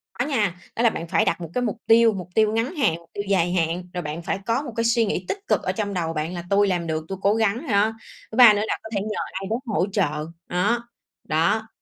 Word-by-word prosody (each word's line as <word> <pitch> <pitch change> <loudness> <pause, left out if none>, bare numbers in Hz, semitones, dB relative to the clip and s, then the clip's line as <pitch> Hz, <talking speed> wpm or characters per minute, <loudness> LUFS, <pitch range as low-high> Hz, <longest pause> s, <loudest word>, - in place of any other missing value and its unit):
Có 245 - -1
nha. 210 - 0 0.2
Đó 235 - 0
là 230 - +6
bạn 165 -5 -5
phải - - +2
đặt - - 0
một 165 - -6
cái 250 - 0
mục 225 -1 -2
tiêu, 225 -1 +6
mục 180 -2 -6
tiêu 215 -1 +4
ngắn 240 +10 -1
hạn, 215 - +2
mục 170 0 -20
tiêu 205 - -3
dài 175 -2 +2
hạn, 170 +1 0
rồi 180 - -2
bạn 155 +3 -5
phải 195 - -2
có 230 +4 +1
một 245 -5 -7
cái 230 - 0
suy 230 0 +3
nghĩ 185 -3 -2
tích - - -2
cực - - +2
ở - - 0
trong 205 -2 -3
đầu 165 -2 -2
bạn 155 +3 -3
là 175 -1 -5
tui 200 0 +4
làm 175 -3 -1
được, 155 0 -2
tui 195 - -5
cố 200 +1 +3
gắng 225 +7 0
đó, 205 +2 +3 0.4
thứ - - -6
ba 240 -4 +10
nữa 205 - 0
là - - -1
có 220 - -8
thể 195 - 0
nhờ 215 0 -4
ai 195 +1 -5
đó 225 - +1
hỗ 195 -5 +1
trợ, 155 -6 0 0.2
đó, 235 +7 0 0.3
đó, 200 +8 +1
200 Hz, 275 wpm, -23 LUFS, 175-225 Hz, 0.4 s, ba